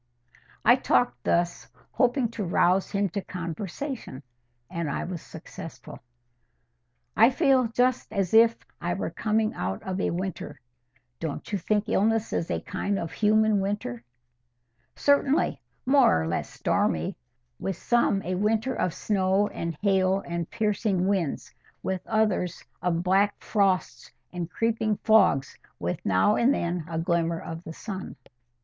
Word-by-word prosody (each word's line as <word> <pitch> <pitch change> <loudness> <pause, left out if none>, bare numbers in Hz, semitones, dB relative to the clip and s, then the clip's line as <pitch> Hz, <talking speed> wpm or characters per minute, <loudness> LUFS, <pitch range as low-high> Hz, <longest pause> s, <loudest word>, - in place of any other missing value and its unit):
I - - +7
talked 125 0 +1
thus, 175 0 0 0.2
hoping 250 -2 +2
to 225 -2 -4
rouse 180 +1 +2
him 200 -1 0
to 200 +4 -3
conversation, 180 - -6 0.4
and 170 +2 -3
I - - -2
was 175 -3 -5
successful. 160 -1 -10 1.2
"I 225 +2 +7
feel 265 -3 +3
just 245 0 0
as 195 -3 -1
if 230 +1 +6 0.2
I - - -1
were - - -3
coming 215 0 0
out 95 +1 -4
of 190 0 -3
a - - +1
winter. 185 +1 -4 0.6
Don't 160 +3 -5
you 200 - 0
think 210 +4 0
illness 225 +2 +1
is 165 - -1
a - - -1
kind 200 +1 -2
of 165 -3 -4
human 215 0 +3
winter?" 195 - -3 0.9
"Certainly—more 275 - +2
or - - -3
less 85 - -2
stormy. 80 0 0 0.4
With 195 -2 -3
some 235 -4 +2
a 185 - -2
winter 220 +6 +1
of 180 -7 -1
snow 195 0 +1
and 165 -2 -4
hail 190 -1 +2
and 170 -1 -3
piercing 205 -4 0
winds; 190 -7 -1 0.3
with 190 -1 -2
others 210 -5 0 0.2
of 170 -1 0
black 195 +3 +3
frosts 195 -3 0 0.2
and 175 -1 -4
creeping 220 0 0
fogs, 215 -11 +3 0.2
with 85 +1 -3
now 95 - +3
and 245 +3 +4
then 175 - -1
a 165 - -3
glimmer 170 0 0
of 165 +1 -7
the 160 - -8
sun." 190 +1 -7
195 Hz, 140 wpm, -26 LUFS, 170-220 Hz, 1.2 s, I